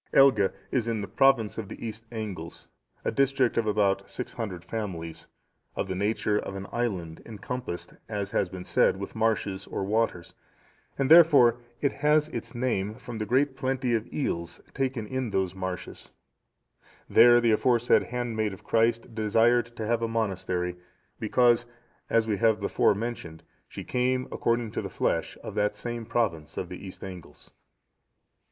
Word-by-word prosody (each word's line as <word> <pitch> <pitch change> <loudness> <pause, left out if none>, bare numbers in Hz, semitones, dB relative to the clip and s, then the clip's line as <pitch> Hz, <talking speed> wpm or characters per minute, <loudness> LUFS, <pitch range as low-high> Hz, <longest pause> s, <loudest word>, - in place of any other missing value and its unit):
Elge 120 -8 +6 0.2
is 120 -3 0
in 115 -2 -1
the 100 - -4
province 115 0 +3
of 105 -3 -6
the 115 - -7
East 110 +1 -8
Angles, 100 -8 -6 0.4
a - - +1
district 135 -2 +2
of 115 -2 +1
about 100 -2 +1
six 125 - -5
hundred 95 -7 -5
families, 90 -8 -5 0.5
of - - -2
the 95 - -2
nature 105 +2 0
of 100 - -6
an 95 0 -5
island, 90 -9 -3
encompassed, 115 -3 -6 0.2
as 100 -1 -3
has 90 - +1
been 90 0 -8
said, - - +3
with 100 - -6
marshes 105 -3 -1
or - - -3
waters, 105 -4 -1 0.6
and 135 +1 0
therefore 145 -8 +7 0.2
it 140 - +2
has 150 +1 +2
its 140 - -6
name 110 -4 -1
from 120 -2 -8
the 105 - -3
great 135 +2 +2
plenty 130 -2 -1
of 110 -1 -1
eels 85 - -3
taken 130 -4 -1
in 130 +2 -3
those 95 -3 0
marshes; 95 -1 -6 1.0
there 120 +1 +7
the 120 -1 +3
aforesaid 120 +2 +3
handmaid 115 -4 -2
of 95 - -12
Christ 115 +1 +1
desired 115 +2 +3
to 110 - -4
have 115 +1 +1
a 115 - 0
monastery, 95 -5 -2 0.4
because, 120 -1 +3 0.4
as 115 -1 +3
we 105 -2 0
have 110 +1 +3
before 100 0 +2
mentioned, 100 -8 -5 0.2
she - - -8
came, 125 +1 0
according 115 -1 0
to - - -3
the - - -5
flesh, - - -1
of - - -6
that 105 0 0
same 120 +1 -5
province 85 -11 -1
of - - -3
the - - -8
East 95 - -10
Angles. 90 -3 -10
110 Hz, 165 wpm, -27 LUFS, 100-120 Hz, 1.0 s, therefore